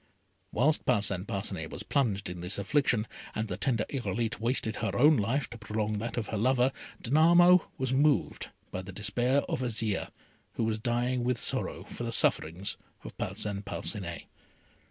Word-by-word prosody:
Whilst 150 +7 +2
Parcin 100 -5 +1
Parcinet 95 -6 -3
was - - -7
plunged 110 -9 0
in 90 -1 -6
this 90 +3 0
affliction, 115 +1 +2 0.3
and 110 +1 -1
the 90 - -3
tender 110 +2 0
Irolite 115 -3 -2
wasted 115 -1 0
her 115 - -2
own 150 +5 +7
life 120 +4 0
to 120 - -8
prolong 105 -1 -2
that 115 +2 -4
of 110 -3 -2
her 110 - -2
lover, 130 +2 +3 0.3
Danamo 170 +6 +6
was 130 -1 -1
moved 145 +2 +2 0.2
by 90 - -3
the 95 +1 -9
despair 120 +7 +1
of - - -3
Azire, 110 -4 -1 0.4
who - - -1
was 110 -1 0
dying 120 +1 0
with 125 0 +1
sorrow - - -2
for - - -7
the - - -2
sufferings 90 +6 +1 0.3
of - - -9
Parcin 100 -2 -2
Parcinet. 100 -3 -3
115 Hz, 165 wpm, -30 LUFS, 100-130 Hz, 0.4 s, own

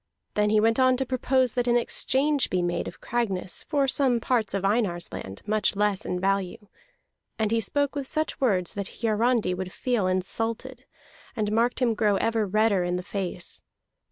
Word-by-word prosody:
Then 210 0 +2
he 215 0 +4
went 225 +3 +2
on 255 -1 +4
to 265 - -1
propose 260 -1 +1
that 245 -1 -1
an 240 0 +4
exchange 275 +4 +1
be 180 -1 0
made 175 0 -1
of - - -9
Cragness 195 -7 -2
for 285 -3 +1
some 260 -3 +2
parts 230 -4 0
of 195 0 -1
Einar's 195 -5 0
land, 95 +1 -7
much 210 -1 +1
less 205 -1 0
in 180 - -2
value. 195 +3 -1 0.7
And 220 -1 0
he 230 0 +2
spoke 285 +6 0
with 280 -2 -3
such 310 +1 -2
words 190 -9 +1
that 200 0 -6
Hiarandi 225 -2 +2
would 185 0 -5
feel 240 -5 0
insulted, 225 +7 -2 0.5
and 210 -3 -1
marked 235 +4 +1
him 235 -2 +3
grow 210 -2 +2
ever 225 +1 0
redder 210 -1 +2
in 175 0 -1
the 180 - -3
face. 180 -3 -3
220 Hz, 185 wpm, -26 LUFS, 195-245 Hz, 0.7 s, he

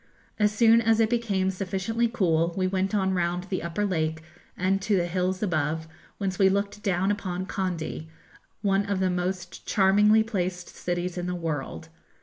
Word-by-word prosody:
As 210 -1 +4
soon 230 +1 +5
as 225 0 +3
it 225 0 +3
became 200 -6 +1
sufficiently 195 +5 -1
cool 170 -7 +1
we 185 - +1
went 190 +2 0
on 190 -2 +1
round 175 0 0
the 185 0 -3
upper 170 +5 -2
lake 160 -4 -1 0.3
and 190 +2 +1
to 200 0 +1
the 175 - +1
hills 185 +2 -1
above, 160 -3 -1 0.3
whence 190 -3 -3
we 190 -1 +6
looked 200 +1 -1
down 190 0 +1
upon 185 -3 -3
Kandy, 175 -5 -3 0.5
one 195 0 +2
of 200 -2 -1
the 185 -1 +1
most 180 0 -3
charmingly 210 +2 +4
placed 185 -5 -3
cities 175 0 -3
in 175 - -3
the 180 - -2
world. 160 -1 -4
190 Hz, 170 wpm, -26 LUFS, 175-205 Hz, 0.5 s, we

